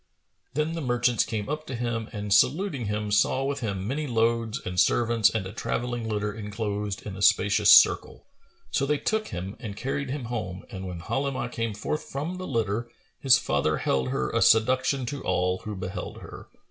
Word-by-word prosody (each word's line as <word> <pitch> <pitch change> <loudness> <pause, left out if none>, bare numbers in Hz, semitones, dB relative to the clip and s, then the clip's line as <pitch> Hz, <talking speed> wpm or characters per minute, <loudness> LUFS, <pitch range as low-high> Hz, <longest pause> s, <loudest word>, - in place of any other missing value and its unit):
Then 155 +2 0
the 165 - -3
merchants 120 -3 +2
came 105 -2 -4
up 155 +2 -4
to 130 - -4
him 115 -2 -3
and 105 -2 -2
saluting 140 - +2
him, 105 0 -2
saw 130 +5 +3
with 140 +1 -2
him 100 -4 -3
many 145 +5 -2
loads 115 0 +1
and 90 0 -2
servants 115 +2 +4
and 110 -4 -2
a 95 - -7
travelling 120 0 -3
litter 105 -1 -1
enclosed 105 -1 -4
in 100 -2 -6
a 95 - -8
spacious 100 +1 +5
circle.[FN#442] - - +5 0.5
So 140 - +1
they 150 +1 +2
took 215 +7 -1
him 95 +3 -5
and 105 -2 -7
carried 135 +2 -3
him 140 0 -3
home; 110 -6 -5
and 95 -3 -6
when 90 -2 -6
Halimah 135 +4 -2
came 115 -3 -3
forth 150 +8 -2
from 155 +7 -4
the 185 - -5
litter, 115 -1 -1 0.3
his 135 -1 +6
father 75 - 0
held 65 -1 0
her 65 - -1
a - - +1
seduction 130 +3 +3
to 140 +3 -5
all 90 0 0
who 105 -1 -4
beheld 95 0 -5
her. - - -11
115 Hz, 190 wpm, -26 LUFS, 100-130 Hz, 0.5 s, his